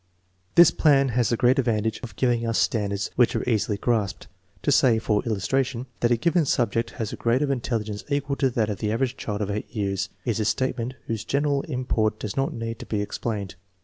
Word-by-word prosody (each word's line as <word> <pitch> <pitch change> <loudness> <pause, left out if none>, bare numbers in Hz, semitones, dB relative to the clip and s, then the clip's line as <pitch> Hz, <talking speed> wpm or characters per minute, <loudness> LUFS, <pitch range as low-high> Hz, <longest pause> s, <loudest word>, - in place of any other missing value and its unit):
This 170 -1 +8
plan 140 -3 +4
has 120 -2 +1
the 120 - +1
great 125 +2 +3
advantage 110 -3 0
of 115 -6 -8
giving 120 -1 +1
us 115 -1 0
standards 100 -3 0
which 120 -1 +3
are - - -2
easily 110 -3 +1
grasped. 105 -3 -1 0.4
To - - +2
say* 120 -3 +5
for 105 -1 +1
illustration, 125 +4 -1
that, 120 - +2
a 120 - +3
given 170 +7 +2
subject 115 -3 0
has 110 -4 -3
a - - -3
grade 120 +4 +1
of 140 - 0
intelligence 110 -6 -2
equal 140 0 0
to 135 - +2
that 110 -3 0
of 100 - -5
the 105 - -1
average 125 +3 0
child 105 -4 -3
of 100 - -3
H 105 +1 -3
years 100 -3 -2 0.2
is 115 -3 0
a 110 - 0
statement 125 +2 -1
whose 110 -2 -3
general 140 +2 0
im 130 -4 -3
port 110 -2 0
does 105 - -5
not 135 0 0
need 115 0 -5
to - - -9
be 105 - -1
explained. 105 -1 -3
115 Hz, 215 wpm, -25 LUFS, 105-130 Hz, 0.4 s, This